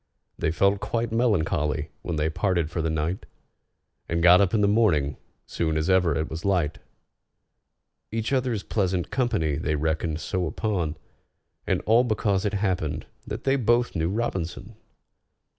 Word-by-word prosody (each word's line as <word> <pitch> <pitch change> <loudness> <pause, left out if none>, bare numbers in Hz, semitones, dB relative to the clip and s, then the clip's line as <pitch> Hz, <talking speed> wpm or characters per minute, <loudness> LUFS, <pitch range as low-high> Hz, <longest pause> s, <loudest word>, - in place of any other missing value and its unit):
They - - -1
felt 100 +4 +2
quite 115 +1 -2
melancholy 80 -10 0
when 85 - -3
they 75 0 +1
parted 85 -3 0
for 85 - -2
the 80 - -1
night, 80 +4 -2 0.8
And 85 0 0
got 90 +2 +8
up 95 -3 +2
in 110 - +2
the 100 - +4
morning 90 -10 +2 0.3
soon 80 -2 -1
as 80 +4 +1
ever 90 -4 +3
it 80 0 -1
was 80 +1 -6
light; 90 -6 0 1.3
Each 115 +3 -2
other's 125 -6 0
pleasant 95 -4 -1
company 80 - 0
they 80 -1 -1
reckoned 80 +1 -1
so 90 +1 -2
upon, 90 -8 -2 0.7
And - - +1
all 115 +3 +4
because 105 -4 0
it 105 - 0
happened 95 -7 -1 0.2
that - - -5
they 135 0 +2
both 120 -1 +2
knew 80 0 0
ROBINSON! 95 -6 -3
90 Hz, 155 wpm, -25 LUFS, 80-105 Hz, 1.3 s, got